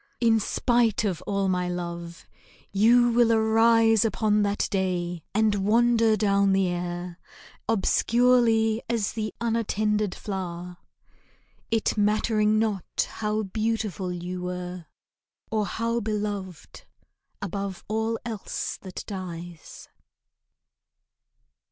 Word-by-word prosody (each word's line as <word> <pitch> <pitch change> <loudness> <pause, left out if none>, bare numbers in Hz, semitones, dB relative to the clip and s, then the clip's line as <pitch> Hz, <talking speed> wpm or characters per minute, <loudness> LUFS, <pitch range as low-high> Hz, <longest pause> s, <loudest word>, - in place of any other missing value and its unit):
In 225 -2 +4
spite 235 0 +1
of 190 -7 -1
all 200 -1 0
my 180 -1 0
love, 170 -1 -6 0.5
you 235 +4 +5
will 235 0 +4
arise 225 0 +4
Upon 215 -1 +1
that 205 0 0
day 180 -3 -1
and 215 0 +2
wander 225 +2 +3
down 200 -1 +3
the 190 -1 +2
air 175 0 -4 0.5
Obscurely 225 0 +3
as 230 -4 0
the 215 -1 -3
unattended 215 -3 0
flower, 180 -3 -5 0.9
It 225 -1 0
mattering 215 +1 +2
not 215 -4 -1
how 215 0 -2
beautiful 215 -2 -2
you 180 +1 -5
were, 180 -1 -5 0.6
Or 215 -2 0
how 230 +1 -1
beloved 205 -4 -5 0.5
above 195 -1 -4
all 220 +1 -1
else 225 -4 -4
that 185 -2 -7
dies. 175 -4 -8
210 Hz, 100 wpm, -26 LUFS, 185-225 Hz, 0.9 s, you